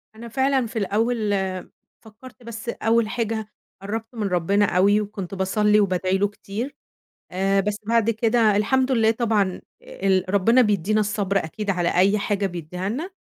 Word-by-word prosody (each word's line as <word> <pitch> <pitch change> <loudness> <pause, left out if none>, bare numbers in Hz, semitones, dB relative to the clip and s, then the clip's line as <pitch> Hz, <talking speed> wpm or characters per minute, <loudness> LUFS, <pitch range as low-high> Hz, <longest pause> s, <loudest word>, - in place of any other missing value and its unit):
أنا 235 +2 -9
فعلًا 265 +2 +1
في 225 0 -4
الأول 215 +1 0 0.7
فكرت 240 +3 -15
بس 230 0 -7
أول 230 -1 +1
حاجة 220 -2 -2 0.3
قرّبت 225 +4 -5
من 215 -3 -2
ربنا 195 +3 +2
أوي، 200 +3 +3
وكنت 200 -3 -6
باصلي 210 +2 +2
وبادعي 185 -1 +1
له 205 - +2
كتير، 210 +6 -6 0.6
آآ، 195 +2 +1
بس 205 +1 -2
بعد 230 0 +2
كده 225 -1 +2
الحمد 260 +5 +1
لله 225 -2 +3
طبعًا، 215 -5 0 0.2
ال 195 - 0
ربنا 230 +6 +5
بيدينا 210 0 +1
الصبر 205 -2 -1
أكيد 200 +5 -4
على 175 -2 0
أي 195 +3 +4
حاجة 200 0 -1
بيديها 180 +1 -5
لنا، 300 - -4
210 Hz, 155 wpm, -23 LUFS, 195-230 Hz, 0.7 s, ربنا